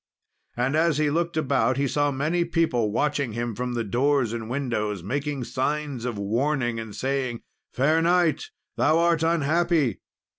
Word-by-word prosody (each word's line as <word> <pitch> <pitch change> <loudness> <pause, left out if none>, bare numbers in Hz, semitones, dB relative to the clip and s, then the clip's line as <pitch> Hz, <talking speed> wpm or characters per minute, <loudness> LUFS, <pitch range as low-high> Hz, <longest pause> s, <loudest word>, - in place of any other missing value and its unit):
And 130 +4 +1
as 160 -1 +2
he 150 -1 +1
looked 170 +1 -1
about, 130 -4 +1
he 140 0 +1
saw 145 +2 +1
many 155 +6 0
people 160 -10 0
watching 140 0 0
him 120 0 -3
from 125 +2 -3 0.2
doors 130 -2 +2
and 115 -1 -5
windows, 110 -8 -2
making 140 - -2
signs 135 +1 -2
of 120 -4 -3
warning, 120 +3 0
and 110 -2 -7
saying, 130 -3 -2 0.3
"Fair 155 +5 +2
knight, 175 - +2 0.3
thou 160 - +3
art 170 -1 +2
unhappy." 165 - +1
140 Hz, 150 wpm, -25 LUFS, 120-155 Hz, 0.3 s, thou